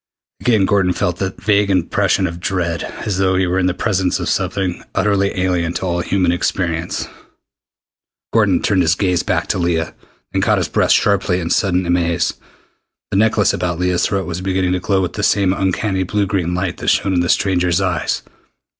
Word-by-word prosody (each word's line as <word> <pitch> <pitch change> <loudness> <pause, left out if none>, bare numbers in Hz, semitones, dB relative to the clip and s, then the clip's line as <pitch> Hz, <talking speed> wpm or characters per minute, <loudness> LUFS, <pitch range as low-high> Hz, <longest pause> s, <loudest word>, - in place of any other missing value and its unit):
Again 110 -5 +2
Gordon 95 -2 +2
felt 90 0 -1
that 95 0 -4
vague 100 0 +2
impression 95 +1 +1
of 85 -1 -4
dread, 85 -2 -2 0.2
as 100 -3 -1
though 95 -1 +2
he 95 0 +2
were 90 +1 0
in 90 - +2
the 90 - +1
presence 95 -4 0
of - - -2
something 95 -3 -2
utterly 100 -2 +1
alien 90 -2 0
to - - -4
all 85 -1 -1
human 90 0 +1
experience. 85 -1 -2 1.3
Gordon - - +3
turned 95 -2 +2
his 85 0 +2
gaze 90 -3 +1
back - - -1
to - - 0
Leah, 85 -2 -1 0.4
then - - 0
caught - - +2
his - - -1
breath - - +1
sharply 90 - +2
in 85 -2 -3
sudden 90 -2 +1
amaze. 85 -1 +1 0.8
The - - +1
necklace 105 -1 +3
about 85 -1 -2
Leah's 90 0 +1
throat 95 -1 -1
was 85 +1 -5
beginning 95 -1 0
to 90 - 0
glow 95 +1 0
with 85 - -3
the 105 - -4
same 100 -2 +2
uncanny 95 0 -1
blue 100 +2 0
green 90 -3 -1
light 90 -1 -2
that - - -7
shone 95 - +2
in 90 - +2
the 85 0 0
stranger's 90 -3 +2
eyes! 90 -4 -1
90 Hz, 190 wpm, -18 LUFS, 90-95 Hz, 1.3 s, Gordon